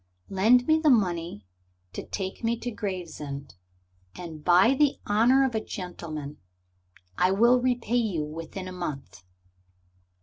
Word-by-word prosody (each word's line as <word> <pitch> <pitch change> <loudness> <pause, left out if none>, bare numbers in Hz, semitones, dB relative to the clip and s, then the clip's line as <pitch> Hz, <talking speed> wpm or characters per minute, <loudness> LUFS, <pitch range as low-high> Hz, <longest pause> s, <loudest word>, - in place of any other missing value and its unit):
Lend 225 +6 +4
me 315 0 +3
the 315 -1 +3
money 175 - +1 0.5
to - - -5
take 190 +1 -5
me 230 +1 +1
to 245 - -3
Gravesend, 170 -9 -6 0.6
and 160 -4 -9
by 180 - +5
the 280 0 +2
honor 240 +6 +4
of 260 - -2
a 220 -1 -1
gentleman 155 -5 -7 0.8
I 180 - +4
will 235 +6 +4
repay 245 -2 0
you 195 -10 0
within 165 +5 -7
a - - -6
month." 150 - -6
190 Hz, 135 wpm, -27 LUFS, 165-240 Hz, 0.8 s, by